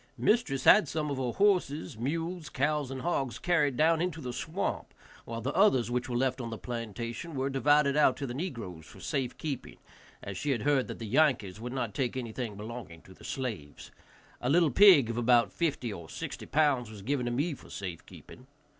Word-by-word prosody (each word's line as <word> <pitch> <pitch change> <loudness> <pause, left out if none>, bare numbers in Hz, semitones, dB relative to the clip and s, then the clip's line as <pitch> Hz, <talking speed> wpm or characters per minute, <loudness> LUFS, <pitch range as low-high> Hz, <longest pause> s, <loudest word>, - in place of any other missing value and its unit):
Mistress 135 - +1
had 210 -7 +7
some 150 0 -2
of 140 - -2
her 125 -3 -2
horses, 180 - +1
mules, 165 +7 -3
cows 145 0 0
and 130 -1 -6
hogs 135 -8 -1
carried 150 -7 +1
down 160 +1 +3
into 175 -2 -2
the 125 -4 -5
swamp, 170 +9 -3 0.3
while 115 0 -5
the 130 +5 -2
others 150 - +3
which 125 +2 -1
were 120 - -1
left 130 +1 0
on 115 - -5
the 115 - -5
plantation 120 +6 -5
were 135 +1 -1
divided 140 +1 +3
out 150 -4 +4
to 140 - -3
the 120 - -5
negroes 115 - -6
for - - -14
safe 130 -4 -2
keeping, 145 -5 -5 0.5
as 100 -2 -5
she 150 - -2
had 125 -6 0
heard 140 -3 +2
that - - -6
the 115 - -6
Yankees 115 -6 +2
would 120 +1 -5
not 120 -5 -3
take 125 +3 -1
anything 115 -3 -4
belonging 105 -6 -8
to 95 - -15
the - - -18
slaves. 110 - -5 0.5
A 125 - -1
little 165 0 +4
pig 150 - +7
of 115 - -5
about 120 0 +4
fifty 145 -9 -1
or 85 -4 -9
sixty - - -6
pounds 140 -6 +2
was 105 -3 -10
given 130 +1 -1
to - - -1
me 145 +7 0
for - - -13
safe 90 -4 -6
keeping. 130 - -14
130 Hz, 205 wpm, -30 LUFS, 115-150 Hz, 0.5 s, had